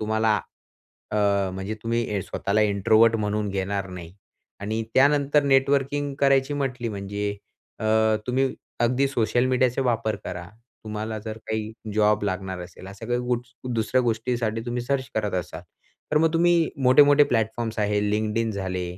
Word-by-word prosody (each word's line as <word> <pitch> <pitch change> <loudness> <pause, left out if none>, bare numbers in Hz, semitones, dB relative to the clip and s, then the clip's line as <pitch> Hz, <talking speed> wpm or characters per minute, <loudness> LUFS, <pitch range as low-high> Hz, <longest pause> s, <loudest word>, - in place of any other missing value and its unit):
तुम्हाला 110 -1 +1 0.7
अ, - - -2 0.4
म्हणजे 95 +3 -4
तुम्ही 115 -4 -1
स्वतःला 100 +2 -1
इंट्रोवर्ट 110 +2 +4
म्हणून 105 -1 -1
घेणार 100 0 -2
नाही. 90 -2 -9 0.5
आणि 110 +3 -2
त्यानंतर 145 +1 +4
नेटवर्किंग 140 +1 +1
करायची 135 0 +3
म्हटली 130 -4 -2
म्हणजे 100 0 -4 0.5
अ, - - -4 0.4
तुम्ही 130 +2 +1 0.3
अगदी 125 +3 +2
सोशल 120 -1 +1
मीडियाचा 130 0 +1
वापर 115 -3 0
करा. 85 0 -6 0.4
तुम्हाला 110 +1 -4
जर 110 +1 -7
काही 110 0 -3 0.2
जॉब 105 -1 +3
लागणार 95 -1 -3
असेल 90 +1 -10
अशा 100 +3 -9
काही 120 +1 0 0.6
दुसऱ्या 115 +3 +1
गोट - - -3
गोष्टीसाठी 115 -1 -1
तुम्ही 120 0 -2
सर्च 130 0 -1
करत 105 -3 -1
असाल, 85 -1 -4 0.5
तर 150 - +5
मग 160 0 +2
तुम्ही 170 -1 +3
मोठे-मोठे 145 +3 +7
प्लॅटफॉर्म्स 115 -1 -1
आहे 105 -1 +1
LinkedIn 110 +2 0
झाले, 95 -2 -3
110 Hz, 140 wpm, -24 LUFS, 105-130 Hz, 0.7 s, मोठे-मोठे